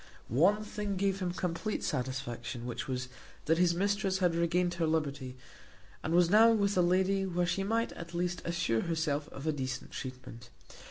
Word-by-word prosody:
One 185 Hz, -, +3 dB
thing 210 Hz, -1 st, -3 dB
gave 195 Hz, 0 st, +1 dB
him 180 Hz, -2 st, -1 dB
complete 180 Hz, +4 st, -2 dB
satisfaction, 125 Hz, -2 st, -3 dB
which 120 Hz, -, -4 dB
was, 130 Hz, -1 st, -3 dB, 0.4 s
that 160 Hz, +1 st, +2 dB
his 175 Hz, -1 st, +4 dB
mistress 200 Hz, +1 st, +1 dB
had 180 Hz, -3 st, +2 dB
regained 175 Hz, +1 st, +1 dB
her 165 Hz, -, +3 dB
liberty, 140 Hz, -5 st, -2 dB, 0.6 s
and 160 Hz, +2 st, -1 dB
was 175 Hz, -1 st, +6 dB
now 215 Hz, +5 st, +7 dB
with 205 Hz, -2 st, +2 dB
a 180 Hz, -, +4 dB
lady 190 Hz, +2 st, +2 dB
where 180 Hz, -1 st, 0 dB
she 180 Hz, +2 st, 0 dB
might 225 Hz, +3 st, 0 dB
at 170 Hz, +1 st, -9 dB
least 175 Hz, 0 st, -1 dB
assure 170 Hz, -10 st, 0 dB
herself 160 Hz, -3 st, -1 dB
of 135 Hz, -, -9 dB
a 155 Hz, -, +2 dB
decent 130 Hz, -3 st, -4 dB
treatment. 125 Hz, -2 st, -8 dB
170 Hz, 175 wpm, -31 LUFS, 140-190 Hz, 0.6 s, now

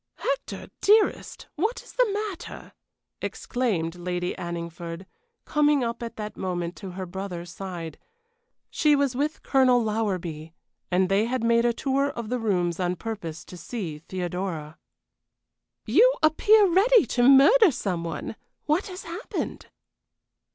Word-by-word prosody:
"Hector, -, -, -3 dB
dearest, 425 Hz, +1 st, +2 dB
what 450 Hz, +3 st, -1 dB
is -, -, -15 dB
the -, -, +2 dB
matter?" 405 Hz, -4 st, -5 dB, 0.5 s
exclaimed 200 Hz, -11 st, -2 dB
Lady 180 Hz, 0 st, -3 dB
Anningford, 170 Hz, +1 st, -6 dB, 0.4 s
coming 295 Hz, -2 st, +3 dB
up 235 Hz, 0 st, -3 dB
at 235 Hz, -1 st, -6 dB
that 210 Hz, -1 st, -6 dB
moment 175 Hz, -2 st, -3 dB
to 190 Hz, -3 st, -8 dB
her 190 Hz, -, -3 dB
brother's 180 Hz, -2 st, -6 dB
side. 175 Hz, -3 st, -7 dB, 0.7 s
She 300 Hz, -2 st, +3 dB
was 280 Hz, -3 st, +1 dB
with 295 Hz, +4 st, -2 dB
Colonel 260 Hz, -2 st, +4 dB
Lowerby, 180 Hz, -8 st, -3 dB, 0.3 s
and 185 Hz, +1 st, +2 dB
they 195 Hz, +3 st, +2 dB
had 245 Hz, 0 st, -2 dB
made 235 Hz, 0 st, +3 dB
a 240 Hz, -, +4 dB
tour 275 Hz, +3 st, 0 dB
of 235 Hz, -5 st, -6 dB
the 250 Hz, 0 st, -1 dB
rooms 180 Hz, -6 st, 0 dB
on 180 Hz, 0 st, 0 dB
purpose 175 Hz, -7 st, -6 dB
to -, -, -11 dB
see 175 Hz, -5 st, -6 dB
Theodora. 175 Hz, -2 st, -5 dB, 1.1 s
"You 450 Hz, -, +5 dB
appear 410 Hz, +7 st, +5 dB
ready 395 Hz, -, +5 dB
to 245 Hz, +2 st, +3 dB
murder 335 Hz, -, +7 dB
some 195 Hz, -, -2 dB
one. 165 Hz, +5 st, -5 dB, 0.3 s
What 310 Hz, +8 st, +1 dB
has 370 Hz, -1 st, -8 dB
happened?" 345 Hz, +7 st, -5 dB
220 Hz, 135 wpm, -26 LUFS, 175-295 Hz, 1.1 s, murder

